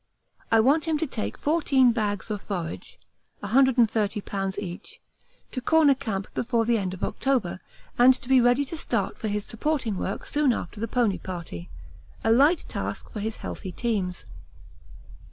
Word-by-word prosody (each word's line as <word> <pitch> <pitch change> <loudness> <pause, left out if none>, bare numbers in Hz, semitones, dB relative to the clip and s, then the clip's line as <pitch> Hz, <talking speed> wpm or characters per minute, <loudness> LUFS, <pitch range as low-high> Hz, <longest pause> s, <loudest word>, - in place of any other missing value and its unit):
I 225 - +6
want 290 +7 +3
him 320 -2 +1
to 320 - 0
take 240 -7 -4
fourteen 280 -5 +3
bags 215 -2 -2
of 205 -2 -3
forage 170 - -5 0.4
(130 250 +3 +4 0.4
lbs. 195 -1 -3
each) 185 -3 -6 0.5
to 255 - -3
Corner 310 +1 +5
Camp 205 -7 -4
before 235 -1 0
the 230 -1 +2
end 190 -2 -3
of 190 - -9
October 245 -10 0 0.4
and 250 +2 +8
to 255 - -8
be 260 -1 +5
ready 245 +4 +3
to 330 - -6
start 330 - -2
for 220 - -3
his 205 -1 -2
supporting 230 -4 -1
work 195 - -3
soon 290 -4 +2
after 205 0 -6
the 230 - -2
pony 230 -5 +1
party 170 - -7 0.5
a 225 - +3
light 290 +8 +4
task - - -5
for 215 - -5
his 220 +2 -3
healthy 190 - -5
teams. 195 -5 -2
230 Hz, 165 wpm, -26 LUFS, 200-265 Hz, 0.5 s, and